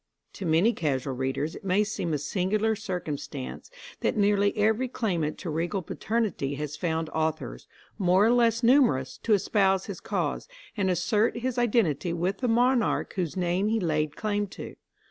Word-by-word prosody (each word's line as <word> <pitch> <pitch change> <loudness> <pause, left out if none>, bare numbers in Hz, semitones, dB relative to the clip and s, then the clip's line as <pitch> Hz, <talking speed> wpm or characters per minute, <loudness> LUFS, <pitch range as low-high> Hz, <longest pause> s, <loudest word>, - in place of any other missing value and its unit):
To 190 - -5
many 170 +9 +4
casual 140 - -1
readers 135 +4 -2
it - - -10
may 195 +2 +2
seem 205 -5 -3
a 150 - +1
singular 205 +8 0
circumstance 175 - -5 0.3
that - - 0
nearly 205 0 +2
every 220 +4 +2
claimant 175 -11 -2
to 170 - -5
regal 175 +5 -2
paternity 200 -11 -2
has 150 0 -4
found 160 0 -1
authors, 155 - -3 0.3
more 185 +1 +4
or 230 - +4
less 235 -1 +3
numerous, 235 - +3
to 225 - +1
espouse 195 -1 +2
his - - -6
cause, - - -2 0.3
and 195 -3 0
assert 195 +6 +1
his 250 +1 -2
identity 200 - +1
with 180 +4 -1
the 250 - 0
monarch 245 +1 +2
whose 180 -2 -3
name 180 +2 +1
he 225 +1 +1
laid 155 -4 -1
claim 205 -1 -1
to. - - -9
190 Hz, 165 wpm, -27 LUFS, 160-220 Hz, 0.3 s, many